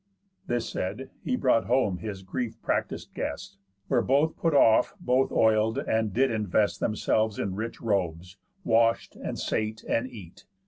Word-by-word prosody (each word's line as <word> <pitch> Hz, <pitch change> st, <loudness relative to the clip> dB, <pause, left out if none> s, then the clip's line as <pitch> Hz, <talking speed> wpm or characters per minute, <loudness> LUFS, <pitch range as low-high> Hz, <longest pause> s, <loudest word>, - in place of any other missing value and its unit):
This 120 Hz, -1 st, -1 dB
said, 130 Hz, +8 st, -4 dB
he 255 Hz, -, 0 dB
brought 125 Hz, -, +2 dB
home 120 Hz, -7 st, +2 dB
his 100 Hz, -3 st, -6 dB
grief 115 Hz, +4 st, -4 dB
practis'd -, -, -2 dB
guest; 100 Hz, -, -5 dB, 0.3 s
Where 125 Hz, -3 st, +2 dB
both 145 Hz, +6 st, +2 dB
put 165 Hz, -3 st, 0 dB
off, 115 Hz, -, +5 dB
both 130 Hz, -5 st, +1 dB
oil'd, 110 Hz, +1 st, +3 dB
and 110 Hz, -5 st, 0 dB
did 130 Hz, +6 st, +2 dB
invest 105 Hz, -1 st, +1 dB
Themselves 110 Hz, 0 st, 0 dB
in 95 Hz, -, -2 dB
rich 110 Hz, +4 st, -5 dB
robes, 90 Hz, -4 st, -2 dB, 0.3 s
wash'd, 115 Hz, 0 st, +2 dB
and -, -, -5 dB
sate, 110 Hz, +1 st, -2 dB
and 115 Hz, +3 st, 0 dB
eat. 100 Hz, -9 st, -12 dB
110 Hz, 150 wpm, -27 LUFS, 105-125 Hz, 0.3 s, off